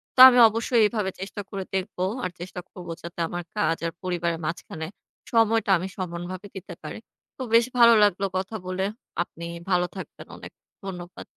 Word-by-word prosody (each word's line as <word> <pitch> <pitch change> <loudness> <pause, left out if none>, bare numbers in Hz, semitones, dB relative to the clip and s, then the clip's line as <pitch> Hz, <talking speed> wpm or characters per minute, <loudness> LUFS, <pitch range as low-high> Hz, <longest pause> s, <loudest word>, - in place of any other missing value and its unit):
তো - - -4
আমি 250 - +3
অবশ্যই 230 +2 +1
এভাবে 210 -4 -1
চেষ্টা 195 +2 -5
করে 195 -1 -4
দেখবো 185 -1 -2 0.2
আর 180 - -2
চেষ্টা 180 +1 -6
করব 180 -1 -10
যাতে 170 0 -9
আমার 175 +1 -4
কাজ 165 -5 +2
আর - - -3
পরিবারের 170 -2 -1
মাঝখানে 160 -1 -4 0.4
সময়টা 225 -2 +3
আমি 185 +3 -4
সমানভাবে 180 +2 -5
দিতে 190 -1 -8
পারি। - - -6 0.4
তো - - -8
বেশ 230 0 +7
ভালো 235 -1 +8
লাগলো 200 -1 +3
কথা 190 +4 -3
বলে। 185 +1 -1 0.4
আপনি 170 -1 -10 0.2
ভালো 180 -1 +3
থাকবেন। 190 - -9
অনেক - - -10 0.3
ধন্যবাদ। 180 -2 -7
185 Hz, 170 wpm, -25 LUFS, 175-210 Hz, 0.4 s, ভালো